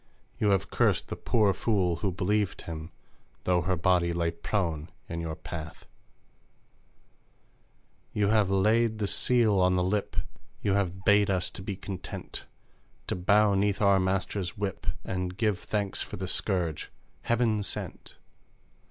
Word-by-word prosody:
You 105 Hz, -, +3 dB
have 100 Hz, -1 st, +1 dB
cursed -, -, +2 dB
the -, -, -3 dB
pour 105 Hz, -4 st, +2 dB
fool 95 Hz, -4 st, +1 dB
who 100 Hz, +2 st, -1 dB
believed 100 Hz, +2 st, 0 dB
him, 80 Hz, 0 st, -6 dB, 0.5 s
Though 90 Hz, -1 st, +2 dB
her 90 Hz, +3 st, 0 dB
body 85 Hz, 0 st, +2 dB
lay 85 Hz, -1 st, 0 dB
prone 85 Hz, -2 st, -2 dB, 0.2 s
in 85 Hz, 0 st, -4 dB
your 80 Hz, -1 st, -3 dB
path! 80 Hz, -2 st, -8 dB, 2.3 s
You 105 Hz, -1 st, +1 dB
have 105 Hz, -3 st, +3 dB
laid 110 Hz, +3 st, +3 dB
the 105 Hz, -, -1 dB
seal 110 Hz, -1 st, +3 dB
on 90 Hz, 0 st, +4 dB
the 90 Hz, -, +2 dB
lip! 100 Hz, +3 st, -1 dB, 0.5 s
You 100 Hz, -, +2 dB
have 95 Hz, -1 st, -1 dB
bade 100 Hz, 0 st, +5 dB
us 90 Hz, -2 st, 0 dB
to -, -, -8 dB
be 100 Hz, +1 st, -4 dB
content! 95 Hz, -2 st, -7 dB, 0.6 s
To -, -, -2 dB
bow 100 Hz, +3 st, +4 dB
'neath 100 Hz, 0 st, +1 dB
our 100 Hz, -2 st, +5 dB
master's 95 Hz, -1 st, -1 dB
whip, 100 Hz, -2 st, -3 dB, 0.2 s
And 90 Hz, -1 st, -3 dB
give 105 Hz, -4 st, +1 dB
thanks 100 Hz, -3 st, -2 dB
for -, -, -5 dB
the 95 Hz, 0 st, -4 dB
scourge 90 Hz, -5 st, -1 dB, 0.3 s
"heaven 115 Hz, -2 st, +1 dB
sent." 100 Hz, -, -5 dB
95 Hz, 145 wpm, -28 LUFS, 90-105 Hz, 2.3 s, bade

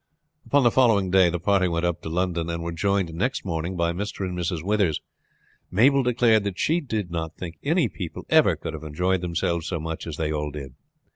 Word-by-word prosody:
Upon 145 Hz, -1 st, +4 dB
the 120 Hz, -, +5 dB
following 110 Hz, -8 st, +3 dB
day 95 Hz, -2 st, +5 dB
the 85 Hz, -, -1 dB
party 95 Hz, +1 st, +2 dB
went 85 Hz, 0 st, -1 dB
up 85 Hz, -1 st, -1 dB
to -, -, -6 dB
London, 85 Hz, -1 st, -1 dB
and 85 Hz, 0 st, -3 dB
were 85 Hz, -, -3 dB
joined 95 Hz, +1 st, 0 dB
next 105 Hz, +11 st, -2 dB
morning 85 Hz, +1 st, -3 dB
by 85 Hz, 0 st, +1 dB
Mr. 100 Hz, +1 st, -4 dB
and 90 Hz, -, -4 dB
Mrs. 85 Hz, -2 st, -2 dB
Withers. 100 Hz, -5 st, +1 dB, 0.7 s
Mabel 135 Hz, +9 st, +4 dB
declared 120 Hz, -3 st, +3 dB
that 100 Hz, -3 st, -3 dB
she 165 Hz, +3 st, +1 dB
did 110 Hz, -, -3 dB
not 80 Hz, -1 st, -4 dB
think 85 Hz, -4 st, -7 dB
any -, -, +2 dB
people -, -, -7 dB
ever -, -, +5 dB
could 80 Hz, -, -6 dB
have 80 Hz, -, -6 dB
enjoyed 90 Hz, +4 st, -1 dB
themselves 85 Hz, -1 st, -1 dB
so 85 Hz, -2 st, -2 dB
much 80 Hz, +1 st, -5 dB
as 75 Hz, -4 st, -5 dB
they 80 Hz, -1 st, -1 dB
all 75 Hz, -1 st, -2 dB
did. 70 Hz, -3 st, -8 dB
90 Hz, 215 wpm, -25 LUFS, 80-100 Hz, 0.7 s, the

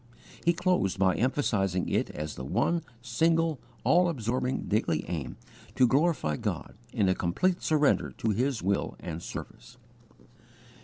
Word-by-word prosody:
He 170 Hz, -, +4 dB
closed 180 Hz, -, +1 dB
by 95 Hz, -1 st, +3 dB
emphasizing 100 Hz, -7 st, 0 dB
it -, -, 0 dB
as 75 Hz, 0 st, -5 dB
the 65 Hz, -, -7 dB
one, 170 Hz, -, +1 dB, 0.2 s
single, 160 Hz, +5 st, +2 dB, 0.2 s
all 175 Hz, +1 st, +4 dB
absorbing, 125 Hz, -2 st, -1 dB
daily 100 Hz, -7 st, 0 dB
aim 80 Hz, -7 st, -4 dB, 0.4 s
to 130 Hz, -, +5 dB
glorify 135 Hz, -, +2 dB
God -, -, -3 dB, 0.2 s
in 105 Hz, -6 st, +1 dB
a 95 Hz, -, +4 dB
complete 175 Hz, -, 0 dB
surrender 150 Hz, -3 st, +2 dB
to 110 Hz, -, 0 dB
His 125 Hz, +2 st, 0 dB
will 100 Hz, +2 st, 0 dB
and 85 Hz, -1 st, -6 dB
service. 125 Hz, +7 st, -8 dB
120 Hz, 140 wpm, -29 LUFS, -, 0.4 s, to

